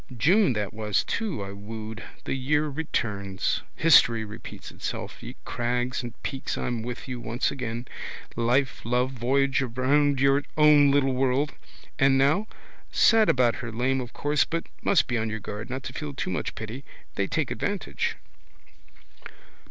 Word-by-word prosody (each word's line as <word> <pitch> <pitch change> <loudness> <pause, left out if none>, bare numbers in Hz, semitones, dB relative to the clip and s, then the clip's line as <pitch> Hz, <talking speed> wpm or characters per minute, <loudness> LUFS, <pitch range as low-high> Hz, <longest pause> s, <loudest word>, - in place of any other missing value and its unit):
June 180 - +4
that 105 -3 -3
was 105 -2 0
too 205 - -2
I 100 - -6
wooed. 110 +2 -7 0.2
The - - -2
year 145 +3 +1
returns. 105 -10 -2
History 120 -8 +5
repeats 105 +1 -9
itself. - - -5
Ye - - -8
crags 125 +2 -1
and 120 -2 -8
peaks 135 - -3
I'm 120 -2 -2
with 120 +3 -6
you 125 -2 -4
once 120 +3 -1
again. 120 -2 -4 0.5
Life, 125 +4 +1
love, 125 +2 +1
voyage 135 +2 +1
round 135 +3 +2
your 135 +1 +4 0.2
own 150 -2 +7
little 140 -1 +3
world. 135 +3 +1 0.5
And 135 -1 +5
now? 155 +11 +3 0.4
Sad 225 -2 +5
about 120 -4 +3
her 120 -1 -5
lame 130 +4 0
of 120 -1 -7
course 145 0 +1
but 165 0 -3 0.2
must 190 -6 +3
be 120 -2 -1
on 110 0 -1
your 110 0 -3
guard 105 +3 -6
not 130 +1 -4
to - - -6
feel 145 -2 -5
too 95 - -3
much 90 - -3
pity. 110 +5 -6 0.3
They - - -1
take - - -1
advantage. - - -2
125 Hz, 160 wpm, -26 LUFS, 115-140 Hz, 0.5 s, own